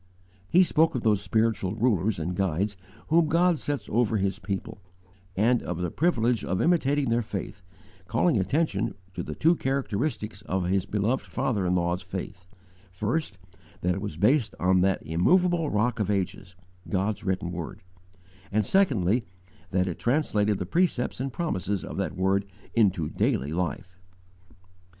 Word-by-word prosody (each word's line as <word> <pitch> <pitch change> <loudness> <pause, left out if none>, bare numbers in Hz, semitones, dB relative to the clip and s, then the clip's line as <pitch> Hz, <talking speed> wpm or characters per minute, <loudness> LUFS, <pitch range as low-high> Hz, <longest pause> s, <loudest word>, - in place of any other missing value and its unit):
He 185 - +6
spoke 160 -2 +2
of 125 - -2
those 105 -3 +3
spiritual 105 -1 0
rulers 110 -3 +1
and 85 +2 -3
guides 95 +2 0 0.3
whom 165 0 +4
God 170 0 +3
sets 145 -1 -3
over 115 -1 +1
his 100 0 -1
people; 100 0 -5 0.5
and 115 +5 +3
of 90 - -4
the 90 -1 -2
privilege 120 -8 +1
of 95 +1 -1
imitating 145 -5 +2
their 120 +1 +2
faith, 100 -4 -6 0.5
calling 130 - +2
attention 135 - 0 0.2
to - - -4
the - - -6
two 165 +3 +4
characteristics 130 - -2
of 95 -1 0
his 95 +2 0
beloved 105 +6 0
father 125 -8 -1
in 90 - +2
law's 85 +1 0
faith: 90 -1 -7 0.4
first, 105 - -2 0.4
that 90 +1 +1
it 95 - -4
was 100 -7 -5
based 110 - +2
on 90 +1 +3
that 95 0 +1
immovable 170 - +2
Rock 110 +3 0
of 105 -2 0
Ages, 95 -2 -2 0.3
God's 100 +2 -1
written 95 -2 -1
word; 85 0 -6 0.7
and 105 0 +1
secondly, 120 - +2 0.4
that 90 0 +1
it 90 - -4
translated 105 -6 +1
the 95 - -3
precepts 165 - 0
and 135 +1 -2
promises 100 - -2
of - - -7
that - - -2
word 95 +1 +1 0.3
into 95 -8 +2
daily 70 -1 0
life. 90 +2 -3
105 Hz, 155 wpm, -27 LUFS, 95-130 Hz, 0.7 s, He